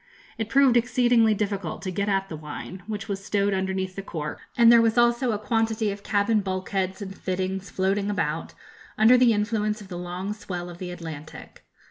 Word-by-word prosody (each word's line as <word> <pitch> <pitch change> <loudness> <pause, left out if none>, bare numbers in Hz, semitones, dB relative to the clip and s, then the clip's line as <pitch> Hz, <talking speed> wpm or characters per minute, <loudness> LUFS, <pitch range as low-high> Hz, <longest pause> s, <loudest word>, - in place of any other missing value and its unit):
It 220 -1 -2
proved 265 -1 +5
exceedingly 240 -2 +3
difficult 200 -5 -3
to 185 - -3
get 200 +3 -1
at 195 -1 +1
the 165 - -6
wine, 155 +4 -8
which 215 -1 -5
was 195 -2 -4
stowed 200 0 +1
underneath 190 0 -2
the 195 - -4
cork, 155 -6 -5 0.2
and 235 -1 +7
there 235 -1 +7
was 225 0 +2
also 240 +1 +3
a 210 - 0
quantity 220 0 0
of 200 0 -7
cabin 205 +2 +2
bulkheads 190 0 -2
and 195 -1 -8
fittings 190 0 -3
floating 195 +3 0
about, 165 -5 -2 0.4
under 220 +4 +7
the 250 -1 +5
influence 210 0 0
of 200 -3 -12
the 175 -2 -5
long 180 +3 -4
swell 180 -5 -6
of 175 - -12
the 180 - -5
Atlantic. 160 -3 -9
200 Hz, 190 wpm, -25 LUFS, 185-220 Hz, 0.4 s, and